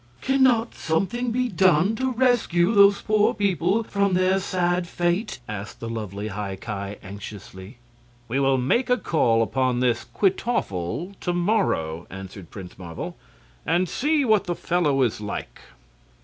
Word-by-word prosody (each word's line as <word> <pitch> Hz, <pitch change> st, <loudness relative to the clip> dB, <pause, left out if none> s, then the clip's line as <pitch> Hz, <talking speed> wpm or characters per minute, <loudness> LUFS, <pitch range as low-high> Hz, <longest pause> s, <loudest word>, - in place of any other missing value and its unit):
"Can 270 Hz, +1 st, +1 dB
not 235 Hz, -3 st, +3 dB
something 200 Hz, +10 st, -1 dB
be 250 Hz, +2 st, 0 dB
done 190 Hz, 0 st, +3 dB
to 260 Hz, +1 st, 0 dB
rescue 230 Hz, -7 st, +2 dB
these 200 Hz, -1 st, +5 dB
poor 215 Hz, +2 st, +2 dB
people 200 Hz, +1 st, +1 dB
from 200 Hz, -3 st, 0 dB
their 185 Hz, +1 st, +3 dB
sad 180 Hz, -2 st, 0 dB
fate?" 175 Hz, -, -1 dB
asked 105 Hz, 0 st, -7 dB
the 115 Hz, -, -6 dB
lovely 105 Hz, -2 st, -5 dB
High 100 Hz, -1 st, -4 dB
Ki, 100 Hz, 0 st, -5 dB
anxiously. 100 Hz, +1 st, -10 dB, 0.5 s
"We 130 Hz, +4 st, -1 dB
will 135 Hz, -1 st, +3 dB
make 185 Hz, -, +1 dB
a 250 Hz, -, +4 dB
call 115 Hz, -, +2 dB
upon 130 Hz, +1 st, 0 dB
this 120 Hz, -2 st, +1 dB
Kwytoffle 170 Hz, -, -1 dB
to 175 Hz, -, -2 dB
morrow," 175 Hz, -, 0 dB
answered 95 Hz, -1 st, -9 dB
Prince 95 Hz, -3 st, -10 dB
Marvel, 85 Hz, -3 st, -6 dB, 0.5 s
"and 175 Hz, +3 st, +1 dB
see 295 Hz, -, +1 dB
what 215 Hz, -4 st, +3 dB
the 175 Hz, -2 st, -2 dB
fellow 150 Hz, -7 st, +1 dB
is 115 Hz, -3 st, -1 dB
like." 105 Hz, -, -6 dB
175 Hz, 150 wpm, -24 LUFS, -, 0.5 s, these